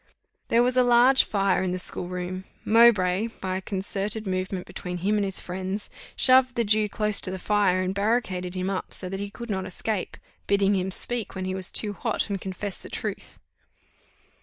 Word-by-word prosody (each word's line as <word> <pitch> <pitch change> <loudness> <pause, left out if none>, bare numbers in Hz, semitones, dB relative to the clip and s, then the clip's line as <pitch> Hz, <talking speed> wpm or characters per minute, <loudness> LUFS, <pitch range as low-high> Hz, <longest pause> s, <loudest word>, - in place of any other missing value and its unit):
There 235 +1 +4
was 250 +1 +1
a 255 - +6
large 245 +2 +5
fire 195 -3 +1
in 185 -1 -1
the - - -1
school 180 -1 -2
room; 180 +1 -5 0.2
Mowbray, 215 -3 +5
by 185 -1 -2
a - - -5
concerted 200 +2 -2
movement 185 -1 -3
between 180 -2 -6
him 200 +4 0
and 205 - +1
his 195 -2 -1
friends, 190 +3 -4 0.2
shoved 255 -1 +5
the 235 - +2
Jew 215 0 +2
close 210 0 +1
to - - -2
the 190 - -4
fire, 185 -2 +2
and 185 +1 -1
barricadoed 200 -4 -1
him 185 0 -2
up, 190 - -4
so 185 - 0
that 195 +1 -4
he 200 0 -4
could 235 +2 -7
not 190 -1 -2
escape, 200 +1 -3 0.3
bidding 200 0 +3
him 190 0 -1
speak 230 +3 -3
when 190 0 -3
he 185 - -2
was 190 0 -3
too 210 -2 +1
hot, 220 0 -2
and 195 - -2
confess 190 +1 -5
the - - -11
truth. - - -5
195 Hz, 200 wpm, -26 LUFS, 185-215 Hz, 0.3 s, a